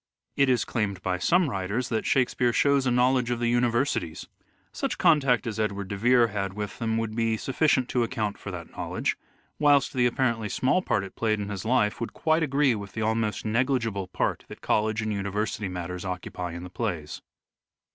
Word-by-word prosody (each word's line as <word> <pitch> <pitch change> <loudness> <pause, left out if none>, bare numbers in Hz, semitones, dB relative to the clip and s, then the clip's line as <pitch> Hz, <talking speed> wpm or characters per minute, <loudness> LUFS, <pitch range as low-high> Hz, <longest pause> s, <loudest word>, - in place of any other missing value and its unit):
It 140 -1 +3
is 125 -2 +2
claimed 100 -5 -2
by 90 -1 -1
some 175 - +3
writers 105 +2 -2
that 110 -2 -1
Shakespeare 125 -2 +2
shows 140 +2 +3
a - - +2
knowledge 125 0 +3
of 120 - 0
the 120 0 0
universities. 120 - 0 0.5
Such - - -3
contact 140 - +3
as 110 -2 -4
Edward 100 -3 -2
de 100 - -3
Vere 120 +3 +4
had 100 -2 -3
with 105 -1 -5
them 110 -1 0
would 110 -1 -2
be 115 -1 +1
sufficient 135 0 +1
to 125 - +1
account 110 -3 -2
for - - -7
that 85 -3 -7
knowledge, - - -2 0.4
whilst 145 -2 +4
the 125 -1 +3
apparently 115 -3 0
small 135 - +2
part 100 - 0
it 95 - -9
played 110 -2 0
in 100 0 -4
his 100 -1 -5
life 115 -3 +1
would 115 - -4
quite 160 0 +1
agree 140 -3 +2
with 100 -2 -6
the 110 - -2
almost 110 -1 -1
negligible 115 -4 0
part - - -1
that - - -10
college 110 +1 +1
and 110 -1 -1
university 100 +1 -2
matters 90 0 -5
occupy 90 -2 -5
in 85 +1 -7
the 90 - -9
plays. 90 -9 -4
115 Hz, 195 wpm, -26 LUFS, 100-125 Hz, 0.5 s, Vere